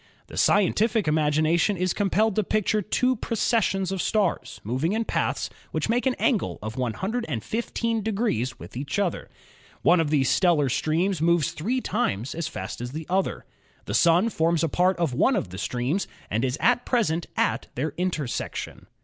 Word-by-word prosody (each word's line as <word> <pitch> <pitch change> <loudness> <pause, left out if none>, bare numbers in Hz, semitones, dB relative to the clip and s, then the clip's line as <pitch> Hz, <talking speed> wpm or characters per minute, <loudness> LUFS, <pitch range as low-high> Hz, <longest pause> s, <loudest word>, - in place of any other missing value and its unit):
The - - -12
scientific 210 +1 +3
imagination 155 +5 +2
is 185 0 0
compelled 205 +1 +1
to 215 - +2
picture 215 +2 +1
two 250 +5 +1
processions 205 -4 0
of 190 -2 -1
stars 205 -5 0
moving 130 - -1
in 225 +1 0
paths - - -1 0.2
which - - -2
make 245 +3 +2
an 255 - +1
angle 230 -7 0
of 110 +1 -5
115 220 - -2
degrees 195 - -1
with - - -11
each 140 +9 -3
other. 195 -4 -1 0.5
One 175 +1 +5
of 160 -3 +1
these 140 -3 +2
stellar 165 -6 +3
streams 160 +6 0
moves 170 -2 +3
three 240 +11 -2
times 130 - -1
as 165 -1 -3
fast 155 - -6
as 120 +1 -5
the 160 +1 -5
other. 190 +1 0 0.4
The - - -4
Sun 175 +6 +4
forms 165 -4 +1
a 165 - +1
part 180 +4 +2
of 170 -6 0
one 260 - +3
of - - -2
the 95 +1 -7
streams 125 - -1 0.2
and 110 +4 0
is 130 -1 0
at 245 0 +3
present 175 -10 0
at - - 0
their 145 +4 -2
intersection. 165 -8 -3
175 Hz, 170 wpm, -25 LUFS, 150-215 Hz, 0.5 s, One